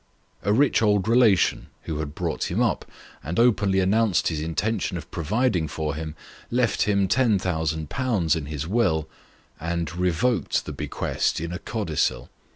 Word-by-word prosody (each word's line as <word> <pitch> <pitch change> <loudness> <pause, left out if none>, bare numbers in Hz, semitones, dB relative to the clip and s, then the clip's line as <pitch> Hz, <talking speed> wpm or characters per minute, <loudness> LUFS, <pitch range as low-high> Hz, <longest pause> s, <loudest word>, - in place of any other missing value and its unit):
A 100 - 0
rich 135 +4 +3
old 105 -2 +2
relation 115 -5 +3 0.2
who 80 -2 -4
had 75 -1 -5
brought - - -2
him - - -1
up, - - +1 0.4
and 80 +4 -4
openly 100 -5 +3
announced 100 +1 +2
his 80 -2 -3
intention 90 +4 -1
of 80 - -9
providing 90 - 0
for 75 0 -3
him, 80 +1 -5 0.3
left 120 -2 +1
him 100 -2 +2
10,000/. 90 - +1
in 80 -3 -3
his 75 0 -4
will, 80 -6 +1 0.5
and 85 +1 -3
revoked 90 +5 0
the - - -5
bequest - - -1
in 85 +2 -4
a 90 - -4
codicil. 80 - -2
90 Hz, 150 wpm, -24 LUFS, 80-110 Hz, 0.5 s, rich